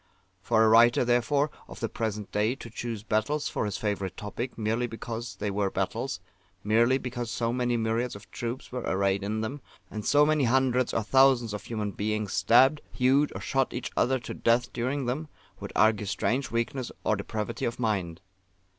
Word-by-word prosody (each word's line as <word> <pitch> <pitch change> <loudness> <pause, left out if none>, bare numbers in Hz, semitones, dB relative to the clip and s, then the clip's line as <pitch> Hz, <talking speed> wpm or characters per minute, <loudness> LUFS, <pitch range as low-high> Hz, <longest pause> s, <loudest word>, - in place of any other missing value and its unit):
For 110 +2 +3
a - - +5
writer, 120 +2 +6
therefore, 130 +5 +2 0.2
of - - -10
the - - -1
present 105 -2 -4
day 105 +4 +1
to 115 -4 -10
choose 115 -2 -5
battles 110 +8 0
for - - -2
his 105 -2 -3
favourite 100 -3 -3
topic, 110 +5 -5
merely 115 +2 0
because 115 -2 -6
they 100 +2 -3
were 100 0 0
battles, 95 +4 -2 0.4
merely 115 +5 +3
because 120 -2 -5
so 115 0 -1
many 120 -1 0
myriads 115 +1 -1
of 100 +3 -13
troops 120 +2 -5
were 125 0 -3
arrayed 100 -1 0
in 110 +2 -2
them, 130 +6 -4 0.3
and 105 -1 -5
so 145 +5 +5
many 155 -2 +2
hundreds 130 0 +2
or 115 - 0
thousands 130 -2 +4
of 105 - -6
human 105 -3 -3
beings 105 0 -2
stabbed, 125 +10 +5
hewed, 135 +3 +3
or - - -5
shot 135 -1 0
each 125 - -4
other 130 +2 +2
to 125 - -7
death 120 +1 +1
during 130 +3 -1
them, 135 +6 -2 0.3
would - - -7
argue 105 0 +3
strange 125 +6 -1
weakness 115 +2 -2
or 110 - +2
depravity 105 +3 -4
of 115 - -2
mind. 95 -7 -1
115 Hz, 185 wpm, -28 LUFS, 105-125 Hz, 0.4 s, writer